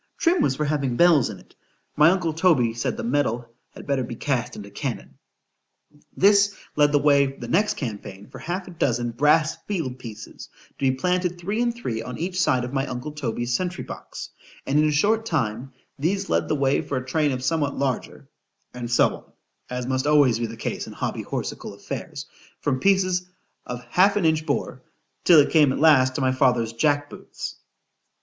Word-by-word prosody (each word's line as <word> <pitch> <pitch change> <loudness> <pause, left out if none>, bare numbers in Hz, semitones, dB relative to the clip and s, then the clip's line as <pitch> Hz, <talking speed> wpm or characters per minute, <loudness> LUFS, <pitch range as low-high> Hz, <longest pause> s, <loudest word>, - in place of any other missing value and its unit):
——Trim 340 -1 +2
was 135 - +2
for 150 - -1
having 140 -4 -1
bells 170 -8 +5
in 105 - -7
it;——my 150 +2 -1
uncle 175 -3 0
Toby 155 -9 +3
said, 115 - -2
the - - -4
metal 120 -2 -1 0.2
had - - -12
better 140 -2 0
be 120 - -6
cast 125 -2 -2
into 100 -1 -9
cannon. - - -5 1.0
This 200 0 +4 0.2
led 145 -1 +4
the 145 - +4
way 140 -1 +4
the 135 -3 -8
next 205 - +2
campaign 100 -5 -6
for - - -11
half 180 +2 -4
a - - -9
dozen 120 -7 -1
brass 150 +6 +3
field 155 -11 -3
pieces, 110 -3 -10 0.3
to 135 - +2
be 130 - -1
planted 180 +2 0
three 200 +6 -2
and 240 0 +2
three 115 - -4
on 125 +2 -7
each 180 +2 -2
side 130 -8 +2
of 125 +2 -5
my 135 0 0
uncle 125 +4 -5
Toby's 120 -4 -3
sentry 180 +6 -2
box; - - -8 0.3
and 140 +2 +2
in 155 0 +3
a - - +1
short 215 +9 +2
time, 130 - -2 0.3
these 190 +6 -1
led 85 0 +1
the - - 0
way 135 -1 +2
for 140 - -3
a 130 - -4
train 150 +2 +1
of 125 -1 -4
somewhat 145 -1 0
larger,—and 125 -2 -6
so 120 - +3 0.5
on—(as 125 0 -3
must 130 +2 -1
always 145 -6 +4
be 120 - -1
the 115 +1 -9
case - - -4
in - - -9
hobby - - -3
horsical - - -5
affairs) - - -7 0.4
from 135 -3 0
pieces 185 -1 +2 0.4
of 125 0 -6
half 185 +11 +3
an 205 -5 +1
inch 160 0 +1
bore, 135 -2 -2 0.4
till 170 -3 +8
it 145 - +3
came 150 -4 +5
at - - -2
last 130 -5 +5
to - - -1
my 130 0 +2
father's 120 -3 +2
jack 145 +3 +1
boots. - - -8
140 Hz, 190 wpm, -24 LUFS, 125-165 Hz, 1.0 s, till